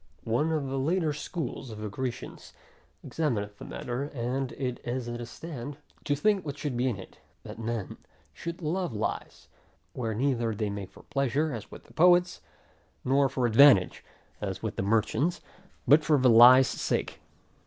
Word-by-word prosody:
One 125 +8 +1
of 155 -3 -1
the 135 0 -2
later 160 +2 +1
school 150 -1 -5
of 110 - -8
the 105 0 -5
Grecians, 125 +4 -6 0.5
examineth 105 -10 -2
the - - -8
matter, 125 +3 -4
and 130 -1 -3
is 125 -1 -4
at 120 0 -5
a 120 - -6
stand, 145 0 -8 0.3
to 145 - +1
think 200 +5 +1
what 145 -2 -6
should 145 -3 -3
be 125 +2 +1
in 115 - -3
it, 95 - -12 0.2
that - - -9
men 115 -3 -4 0.4
should 170 +1 -7
love 170 -4 -2
lies; 105 - -4 0.5
where 115 -4 -3
neither 120 -3 0
they 105 -1 -2
make 100 -2 -6
for - - -17
pleasure, 140 +3 -1
as 115 - -7
with - - -14
poets, 180 +1 +4 0.6
nor 135 +1 +3
for 130 -1 -1
advantage, 120 -4 +5 0.4
as - - -4
with - - -3
the - - -2
merchant; 115 - +1 0.5
but 150 +5 +6
for 150 -1 +3
the 130 -2 +4
lie's 125 +3 +8
sake. - - -2
130 Hz, 165 wpm, -28 LUFS, 115-150 Hz, 0.6 s, lie's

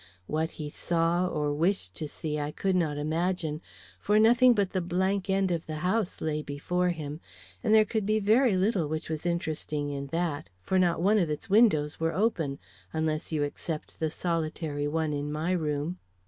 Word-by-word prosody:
What 160 +7 -1
he 150 -2 -5
saw 170 +2 +1
or 150 -3 -1
wished 160 - 0
to 155 - -3
see 150 +1 -3
I 145 0 -2
could 190 +5 -1
not 160 -5 +1
imagine, 160 +1 -1 0.4
for 210 +1 +2
nothing 240 +3 +6
but 200 -3 +1
the 185 - 0
blank 190 +3 0
end 190 -1 +2
of 170 -1 -2
the 155 - -4
house 190 0 0
lay 155 -1 -1
before 175 +5 -1
him, 155 -3 -4 0.4
and 220 - +1
there 215 0 +7
could 220 0 -1
be 215 0 +3
very 215 +1 +4
little 190 -4 +1
which 155 +1 -4
was 160 +2 -3
interesting 155 -3 -2
in 140 0 -4
that, 160 - -2
for 190 - +1
not 175 -2 +2
one 210 +3 +4
of 170 -5 +1
its 150 +5 -5
windows 180 -9 +4
were 165 0 0
open, 165 -10 0 0.3
unless 160 0 -1
you 155 -2 +1
except 150 +2 -5
the 160 - 0
solitary 155 -3 -2
one 155 0 -1
in 145 0 -3
my 155 +4 -1
room. 155 0 -1
165 Hz, 190 wpm, -28 LUFS, 150-190 Hz, 0.4 s, there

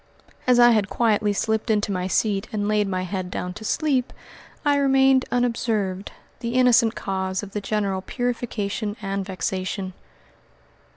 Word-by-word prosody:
As 250 -1 +5
I 240 0 +8
had 210 -4 +2
quietly 215 -3 +2
slipped 220 +3 -1
into 210 -1 +1
my 185 -1 -1
seat 200 +1 0
and 205 -1 -1
laid 210 -1 +2
my 185 -1 -2
head 185 0 -4
down 180 0 -4
to 220 - -10
sleep, 265 +1 0 0.5
I 290 -1 +4
remained 270 -1 +4
unobserved 220 -6 -1 0.3
the 235 0 -3
innocent 250 -2 +4
cause 190 0 -2
of 200 - -8
the 210 - -3
general 200 -2 -1
purification 220 -2 -3
and 195 0 -2
vexation. 190 0 -3
210 Hz, 150 wpm, -23 LUFS, 195-240 Hz, 0.5 s, I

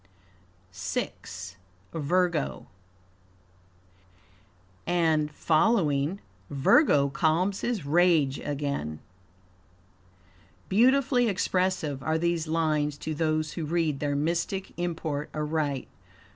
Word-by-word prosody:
VI. 95 -2 -3 0.8
Virgo 165 - 0 2.2
"And 160 -3 +2
following 155 -1 +1 0.3
Virgo 140 - +4
calms 170 +7 +1
his 230 -11 -2
rage 155 -3 +3
again." 140 - -3 1.7
Beautifully 250 +3 +4
expressive 185 -7 0
are 160 +3 0
these 170 -1 0
lines 155 -2 0
to 155 - -4
those 155 0 -1
who 165 - -4
read 155 -2 0
their 145 -1 -1
mystic 170 +6 -1
import 160 -4 -3
aright. 150 -3 -1
155 Hz, 80 wpm, -27 LUFS, 145-175 Hz, 2.2 s, Virgo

